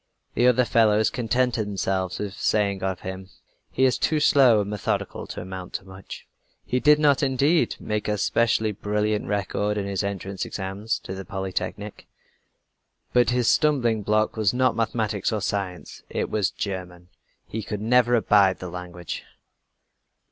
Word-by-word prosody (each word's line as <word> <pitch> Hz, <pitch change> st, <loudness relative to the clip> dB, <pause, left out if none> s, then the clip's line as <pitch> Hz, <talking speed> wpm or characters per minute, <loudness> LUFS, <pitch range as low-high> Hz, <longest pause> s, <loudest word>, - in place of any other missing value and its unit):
The 120 Hz, -, +3 dB
other 125 Hz, 0 st, +4 dB
fellows 110 Hz, -2 st, +3 dB
contented 120 Hz, -2 st, 0 dB
themselves 95 Hz, -2 st, -2 dB
with 105 Hz, -2 st, -4 dB
saying 100 Hz, -1 st, 0 dB
of 95 Hz, -1 st, -2 dB
him: 95 Hz, 0 st, -7 dB, 0.4 s
"He 130 Hz, -, 0 dB
is 130 Hz, -, +2 dB
too 155 Hz, -, +1 dB
slow, 130 Hz, -6 st, +5 dB
and 100 Hz, -, -4 dB
methodical 105 Hz, -1 st, -3 dB
to -, -, -6 dB
amount 95 Hz, 0 st, -8 dB
to -, -, -4 dB
much." 95 Hz, 0 st, -10 dB, 0.4 s
He 125 Hz, -, 0 dB
did 150 Hz, +2 st, +5 dB
not, 145 Hz, -2 st, +3 dB
indeed, 140 Hz, +4 st, +2 dB
make 105 Hz, -1 st, -3 dB
a 105 Hz, 0 st, 0 dB
specially 110 Hz, +1 st, +1 dB
brilliant 105 Hz, +1 st, -1 dB
record 105 Hz, +1 st, -1 dB
in 100 Hz, -, -2 dB
his 100 Hz, 0 st, -2 dB
entrance 100 Hz, -1 st, -4 dB
examinations 100 Hz, +3 st, -3 dB
to 95 Hz, -, -7 dB
the 95 Hz, 0 st, -6 dB
Polytechnique; 95 Hz, +1 st, -5 dB, 1.1 s
but 120 Hz, -1 st, +4 dB
his 125 Hz, -1 st, +1 dB
stumbling 120 Hz, -8 st, +2 dB
block 105 Hz, +1 st, +1 dB
was 110 Hz, 0 st, +1 dB
not 130 Hz, 0 st, +2 dB
mathematics 110 Hz, -3 st, -1 dB
or 110 Hz, -, -1 dB
science, 95 Hz, -2 st, -4 dB
it -, -, -3 dB
was 105 Hz, -4 st, +1 dB
German! 90 Hz, -3 st, -6 dB, 0.4 s
He 110 Hz, 0 st, -5 dB
never 120 Hz, +3 st, +2 dB
could 115 Hz, -, 0 dB
abide 100 Hz, -2 st, +4 dB
the 90 Hz, -, -7 dB
language! 90 Hz, -1 st, -7 dB
105 Hz, 155 wpm, -24 LUFS, 95-120 Hz, 1.1 s, slow